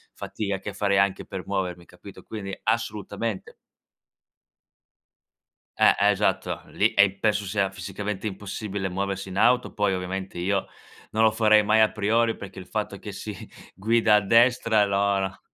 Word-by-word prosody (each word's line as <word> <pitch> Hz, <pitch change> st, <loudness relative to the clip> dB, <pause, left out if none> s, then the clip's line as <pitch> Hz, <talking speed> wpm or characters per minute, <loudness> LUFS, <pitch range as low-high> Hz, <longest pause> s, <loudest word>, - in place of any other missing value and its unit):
fatica 100 Hz, -2 st, -4 dB
che 100 Hz, +1 st, -7 dB
farei 100 Hz, -1 st, +1 dB
anche 100 Hz, -1 st, +1 dB
per 95 Hz, -1 st, -7 dB
muovermi, 90 Hz, -3 st, -3 dB
capito, 90 Hz, +3 st, -14 dB
quindi 100 Hz, -3 st, -7 dB
assolutamente. 110 Hz, -2 st, -2 dB, 2.3 s
Eh, -, -, +6 dB
esatto, 105 Hz, -, 0 dB
lì -, -, +1 dB
e 100 Hz, 0 st, +5 dB
penso 105 Hz, -2 st, +1 dB
sia 100 Hz, 0 st, 0 dB
fisicamente 100 Hz, +1 st, -5 dB
impossibile 100 Hz, -1 st, -4 dB
muoversi 95 Hz, +1 st, -3 dB
in 95 Hz, -, -6 dB
auto, 125 Hz, +4 st, +3 dB
poi 105 Hz, -2 st, +1 dB
ovviamente 95 Hz, 0 st, -4 dB
io, 95 Hz, +2 st, 0 dB, 0.5 s
non 110 Hz, -, 0 dB
lo 110 Hz, -, +6 dB
farei 110 Hz, -1 st, +5 dB
mai 110 Hz, +1 st, +4 dB
a 110 Hz, -, +4 dB
priori, 110 Hz, +2 st, +1 dB
perché 95 Hz, -1 st, -10 dB
il 95 Hz, -, -8 dB
fatto -, -, -4 dB
che -, -, -8 dB
si -, -, -7 dB, 0.4 s
guida 110 Hz, +2 st, +3 dB
a -, -, +6 dB
destra 115 Hz, +1 st, +4 dB
loro, 100 Hz, -1 st, 0 dB
100 Hz, 145 wpm, -25 LUFS, 95-110 Hz, 2.3 s, Eh